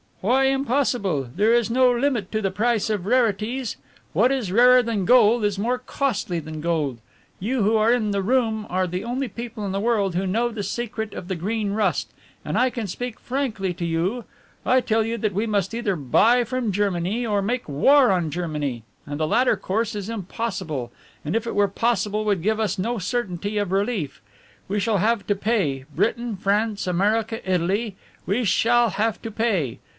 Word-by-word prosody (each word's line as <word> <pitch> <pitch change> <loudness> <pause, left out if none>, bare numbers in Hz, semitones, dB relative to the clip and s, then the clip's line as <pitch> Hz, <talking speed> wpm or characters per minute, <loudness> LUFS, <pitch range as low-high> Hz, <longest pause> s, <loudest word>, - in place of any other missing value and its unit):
"Why 255 +7 +3
impossible? 245 - 0
There 215 +4 +3
is 235 -2 +2
no 255 +1 +4
limit 240 -5 0
to 215 - -1
the 195 -2 0
price 220 +1 +1
of 200 -3 -2
rarities. 235 +1 0 0.4
What 225 - +3
is 250 -9 -1
rarer 250 +4 +6
than 220 -5 -1
gold 235 -1 +5
is 205 -1 0
more 245 +4 0
costly 250 -8 -2
than 155 -1 -6
gold. 155 -7 -1 0.4
You 230 +4 0
who 215 +3 +3
are 220 +2 +3
in 225 -4 +1
the 200 -1 0
room 220 -2 +1
are 185 +1 +1
the 180 +1 -4
only 250 +3 -2
people 230 0 -6
in 195 - -2
the 195 - -1
world 205 -4 +1
who 185 +2 -1
know 230 +6 +1
the 225 -3 -5
secret 220 0 -4
of 175 - -7
the 190 - -2
Green 205 +4 -2
Rust, 210 -1 0 0.3
and - - -1
I 255 - +3
can 235 -3 -4
speak 245 +5 -5
frankly 235 -8 -2
to 170 - -3
you. 175 +9 -1 0.4
I 255 - +4
tell 225 -2 +1
you 230 +1 -2
that 210 -1 -1
we 210 +5 -1
must 200 -1 0
either 230 -4 -1
buy 220 - +3
from 240 -2 -2
Germany 200 +3 0
or 205 -3 +1
make 240 +5 -2
war 255 - +5
on 175 -4 +1
Germany, 150 -7 -3 0.2
and 145 +1 -5
the 155 - +1
latter 245 +8 +3
course 220 +3 -2
is 205 0 -5
impossible, 185 - -4 0.3
and 155 - -2
if 230 +1 -1
it - - -3
were 205 0 +4
possible 210 0 0
would 200 -5 0
give 220 +2 +1
us 215 -1 0
no 230 +6 -1
certainty 205 -1 -2
of 205 -3 -1
relief. 195 - -1 0.5
We 205 +2 -1
shall 220 0 +1
have 215 +2 +1
to 205 - +2
pay, 190 - 0
Britain, 230 +3 0
France, 205 +2 0
America, 210 +5 +1
Italy 190 +4 0 0.3
we 215 +6 +1
shall 235 +4 +3
have 220 +1 -1
to 225 - -5
pay. 200 - -1
215 Hz, 190 wpm, -23 LUFS, 190-235 Hz, 0.5 s, rarer